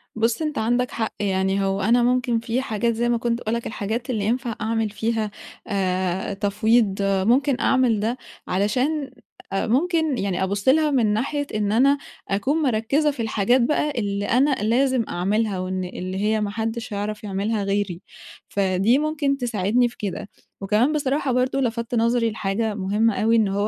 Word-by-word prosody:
بُص 225 +5 0
أنت 305 -2 -2
عندك 245 +3 +1
حق، 220 -1 -3
يعني 195 0 0
هو 195 +1 -1
أنا 235 +4 +3
ممكن 250 -1 +1
في 235 +3 -1
حاجات 235 -1 -1
زي 240 +2 0
ما 240 - +2
كنت 235 0 -1
باقول 225 0 -2
لك 235 - -4
الحاجات 220 +4 -4
اللي 215 -5 -1
ينفع 240 +1 -1
أعمل 225 0 0
فيها 220 0 -2 0.4
آآ 185 -1 -1
تفويض، 205 +1 +2
ممكن 235 +8 +2
أعمل 250 -5 +2
ده، 230 +4 -1 0.3
علشان 255 +9 0 0.4
أ 195 - 0
ممكن 320 +2 +1
يعني 190 -1 -1
أبُص 200 +4 -2
لها 300 +2 +4
من 230 -6 +2
ناحية 280 +6 -1
إن 205 -1 0
أنا 275 +5 +4 0.3
أكون 265 +11 0
مركزة 275 +4 +1
في 250 - -6
الحاجات 225 +3 +2
بقى 300 +4 +1
اللي 205 -5 -2
أنا 260 +7 +3
لازم 245 +2 +2
أعملها، 200 +3 0
أو 185 0 -3
إن 185 0 -2
اللي 185 +1 -5
هي 215 +1 +1
ما 205 - -1
حدش 225 +1 -4
هيعرف 210 +1 -4
يعملها 205 +2 -1
غيري، 195 -3 -1 0.5
فدي 195 +5 +2
ممكن 295 -2 0
تساعدني 240 0 +1
في 235 - -18
كده، 200 0 -5 0.3
وكمان 215 +9 +2
بصراحة 280 -2 0
برضه 255 +2 +1
لَفتّ 235 -1 -2
نظري 230 0 +2
لحاجة 210 +1 -1
مهمة 210 +3 +1
أوي، 225 +1 +3
إن 220 -3 +3
هو 200 +2 0
225 Hz, 170 wpm, -23 LUFS, 200-250 Hz, 0.5 s, لها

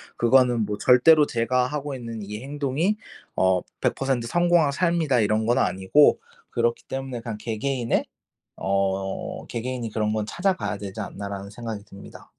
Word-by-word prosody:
그거는 120 -1 +4
뭐 105 0 -3
절대로 150 +5 +6
제가 125 0 +1
하고 145 0 -4
있는 115 -3 -6
이 105 +1 -6
행동이 145 +8 -1 0.4
어 95 -1 +3 0.2
100% 130 -3 0
성공한 175 -1 +3
삶이다 160 -6 +1
이런 110 +1 +1
건 120 - +3
아니고 95 +11 +4 0.3
그렇기 120 0 0
때문에 135 -3 -5
그냥 115 -3 -5
개개인의 120 +2 -1 0.5
어 95 0 -2
'개개인이 120 -1 -4
그런 105 0 0
건 110 -1 -1
찾아가야 180 - -1
되지 100 +1 -7
않나.'라는 100 0 -6
생각이 110 -1 -6
듭니다. 100 -1 -13
120 Hz, 320 characters per minute, -24 LUFS, 105-135 Hz, 0.5 s, 절대로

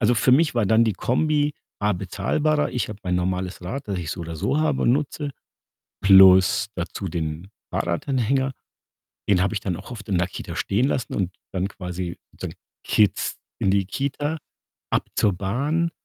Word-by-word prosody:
Also, 120 +1 +4
für 120 +3 +3
mich 150 +1 +4
war 115 -4 +2
dann 110 +3 +5
die 110 - +1
Kombi 145 - +1 0.3
A 105 +1 +2
bezahlbarer. 105 - 0
Ich 125 - -2
habe 105 -2 -7
mein 90 -3 -1
normales 90 +1 -2
Rad, 125 +10 -5
das 100 -2 -1
ich 85 -4 -4
so 85 - -4
oder 85 -1 -6
so 140 - 0
habe 155 -3 +1
und 120 - +4
nutze, 145 +1 -1 0.7
plus 95 -1 +7
dazu 90 +2 -4
den 80 +1 -4 0.2
Fahrradanhänger. 130 +8 0 0.8
Den 95 -3 +4
habe 100 +3 +1
ich 105 - -1
dann 95 -3 -2
auch - - -11
oft 110 -3 -8
in 95 - +2
der 90 +1 +1
Kita - - -7
stehen 115 +7 +1
lassen 130 -4 -2
und 95 -4 0
bin - - -39
dann 95 0 0
quasi 90 -2 -5
sozusagen - - -7 0.3
Kids 105 -4 +2 0.2
in 95 - +2
die 100 -1 +2
Kita, 140 - -2 0.5
ab - - +1
zur 105 - +3
Bahn, 140 - 0
100 Hz, 185 wpm, -24 LUFS, 90-135 Hz, 0.8 s, plus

